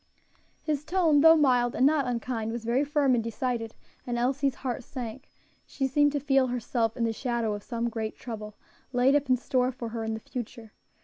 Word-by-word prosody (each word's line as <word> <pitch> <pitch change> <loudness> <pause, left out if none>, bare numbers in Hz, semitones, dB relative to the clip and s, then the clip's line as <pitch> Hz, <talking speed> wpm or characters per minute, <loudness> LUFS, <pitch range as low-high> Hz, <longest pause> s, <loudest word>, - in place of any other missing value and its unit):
His 300 -2 -1
tone, 320 -3 +3
though 325 +1 +8
mild, 250 -5 +3
and 255 - +3
not 285 -2 +3
unkind, 235 -2 -2
was 230 -1 -5
very 245 +4 +2
firm 290 -2 +2
and 235 -2 +1
decided, 230 0 -3 0.3
and 240 -1 -1
Elsie's 270 +2 0
heart 250 0 -2
sank; 250 +1 -7 0.4
she 270 - -2
seemed 290 +2 +3
to 290 - 0
feel 270 -1 +2
herself 240 -1 -1
in 235 - 0
the 225 -1 +1
shadow 235 -2 -1
of 205 - -5
some 235 +1 -3
great 220 -2 -4
trouble 215 -3 -7 0.4
laid 250 +2 +4
up 285 -2 +1
in 255 - +4
store 255 +1 0
for 240 -2 -6
her 225 0 -4
in 220 0 -2
the - - -6
future. 230 -1 -8
250 Hz, 200 wpm, -28 LUFS, 230-275 Hz, 0.4 s, though